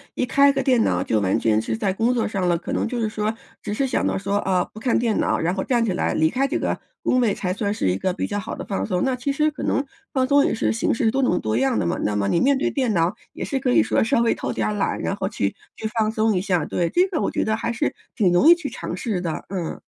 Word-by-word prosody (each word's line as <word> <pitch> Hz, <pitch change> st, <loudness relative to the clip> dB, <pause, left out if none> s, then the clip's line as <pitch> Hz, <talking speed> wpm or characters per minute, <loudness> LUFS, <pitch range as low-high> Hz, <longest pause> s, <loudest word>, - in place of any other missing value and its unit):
一 -, -, 0 dB
开 280 Hz, +3 st, +4 dB
个 270 Hz, -1 st, -1 dB
电 255 Hz, -3 st, +3 dB
脑 90 Hz, 0 st, +1 dB
就 110 Hz, -, +1 dB
完 95 Hz, -2 st, +1 dB
全 110 Hz, -1 st, +2 dB
是 110 Hz, 0 st, -2 dB
在 190 Hz, -, 0 dB
工 230 Hz, +6 st, +1 dB
作 235 Hz, -2 st, 0 dB
上 195 Hz, -3 st, -1 dB
了， 175 Hz, -1 st, +2 dB
可 -, -, -7 dB
能 -, -, 0 dB
就 245 Hz, +1 st, -3 dB
是 220 Hz, -, 0 dB
说， 215 Hz, 0 st, -2 dB, 0.3 s
只 210 Hz, -, -4 dB
是 270 Hz, +6 st, 0 dB
想 260 Hz, -, 0 dB
到 -, -, 0 dB
说， 200 Hz, +1 st, -1 dB
啊， 190 Hz, -3 st, +1 dB
不 215 Hz, -, -12 dB
看 245 Hz, +2 st, +1 dB
电 230 Hz, -3 st, +1 dB
脑， -, -, +1 dB
然 170 Hz, +2 st, 0 dB
后 190 Hz, -, -2 dB
站 240 Hz, +1 st, +1 dB
起 215 Hz, -, 0 dB
来 180 Hz, -, 0 dB
离 160 Hz, 0 st, +3 dB
开 270 Hz, +9 st, 0 dB
这 285 Hz, -, -1 dB
个 -, -, -2 dB, 0.2 s
工 255 Hz, -, +2 dB
位 230 Hz, -5 st, +2 dB
才 180 Hz, -2 st, -3 dB
算 205 Hz, +1 st, -1 dB
是 155 Hz, -, 0 dB
一 90 Hz, -, 0 dB
个 185 Hz, -, -1 dB
比 -, -, -2 dB
较 205 Hz, -, -2 dB
好 200 Hz, -, -5 dB
的 -, -, -6 dB
放 195 Hz, -, -2 dB
松。 180 Hz, -4 st, -1 dB
那 265 Hz, -, +1 dB
其 250 Hz, +3 st, -2 dB
实 305 Hz, +2 st, +2 dB
可 295 Hz, -, -9 dB
能 275 Hz, -, 0 dB, 0.3 s
放 260 Hz, -3 st, +2 dB
松 280 Hz, +2 st, +4 dB
也 -, -, +1 dB
是 -, -, 0 dB
形 225 Hz, -, 0 dB
式 225 Hz, -1 st, +1 dB
多 270 Hz, -, 0 dB
种 215 Hz, -9 st, +2 dB
多 110 Hz, 0 st, -1 dB
样 135 Hz, -2 st, +1 dB
的 100 Hz, -, 0 dB
嘛， 85 Hz, -, 0 dB
那 105 Hz, -, 0 dB
么 100 Hz, -1 st, 0 dB
你 170 Hz, -, +2 dB
面 275 Hz, +1 st, +3 dB
对 270 Hz, -, 0 dB
电 255 Hz, -6 st, 0 dB
脑 170 Hz, 0 st, +2 dB, 0.2 s
也 -, -, -5 dB
是 270 Hz, -, -2 dB
可 240 Hz, -, 0 dB
以 110 Hz, -2 st, +5 dB
说 110 Hz, 0 st, +1 dB
稍 230 Hz, +1 st, +2 dB
微 235 Hz, -, +3 dB
偷 -, -, -4 dB
点 -, -, -1 dB
儿 -, -, -1 dB
懒， 205 Hz, -, -1 dB
然 -, -, -1 dB
后 190 Hz, -1 st, -2 dB
去 105 Hz, -, -1 dB, 0.3 s
去 -, -, -8 dB
放 215 Hz, -1 st, +2 dB
松 220 Hz, 0 st, +1 dB
一 185 Hz, -, +1 dB
下， 180 Hz, -4 st, 0 dB
对， 175 Hz, -, -1 dB
这 360 Hz, +1 st, +3 dB
个 340 Hz, -5 st, -1 dB
我 -, -, 0 dB
觉 -, -, -1 dB
得 220 Hz, 0 st, 0 dB
还 235 Hz, -, -2 dB
是 235 Hz, -, -1 dB, 0.2 s
挺 195 Hz, -6 st, +3 dB
容 175 Hz, -, +4 dB
易 340 Hz, -, +9 dB
去 325 Hz, -5 st, -5 dB
尝 -, -, -5 dB
试 215 Hz, -7 st, -2 dB
的， 170 Hz, -3 st, -4 dB
嗯。 180 Hz, -4 st, -4 dB
210 Hz, 330 characters per minute, -22 LUFS, 175-250 Hz, 0.3 s, 易